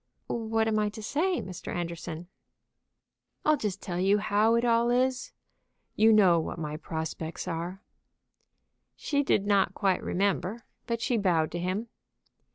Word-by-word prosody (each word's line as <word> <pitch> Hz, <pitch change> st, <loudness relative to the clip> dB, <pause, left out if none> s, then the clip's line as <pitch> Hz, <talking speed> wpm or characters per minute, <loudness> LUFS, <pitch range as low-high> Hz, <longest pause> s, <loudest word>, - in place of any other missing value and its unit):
"What 225 Hz, -1 st, 0 dB
am 215 Hz, -1 st, +1 dB
I 210 Hz, 0 st, +1 dB
to 220 Hz, -, -7 dB
say, 345 Hz, -, 0 dB
Mr. 185 Hz, -2 st, -7 dB
Anderson?" 170 Hz, -1 st, -5 dB, 1.2 s
"I'll 305 Hz, -, +5 dB
just 210 Hz, -8 st, -4 dB
tell 175 Hz, -1 st, -3 dB
you 195 Hz, +3 st, +4 dB
how 215 Hz, +2 st, +2 dB
it 235 Hz, +1 st, +2 dB
all 235 Hz, 0 st, +3 dB
is. 255 Hz, +1 st, +1 dB, 0.6 s
You 220 Hz, +1 st, +5 dB
know 190 Hz, -6 st, +6 dB
what 160 Hz, -, -4 dB
my 150 Hz, -2 st, -4 dB
prospects 160 Hz, +1 st, -5 dB
are." 175 Hz, +3 st, -4 dB, 1.1 s
She 285 Hz, -1 st, 0 dB
did 210 Hz, -8 st, +1 dB
not 200 Hz, -2 st, +2 dB
quite 190 Hz, -2 st, +1 dB
remember, 200 Hz, +3 st, -1 dB, 0.2 s
but 230 Hz, -1 st, -2 dB
she 245 Hz, 0 st, +1 dB
bowed 170 Hz, -6 st, +2 dB
to 175 Hz, -, -3 dB
him. 185 Hz, +6 st, -2 dB
200 Hz, 150 wpm, -28 LUFS, 175-230 Hz, 1.2 s, know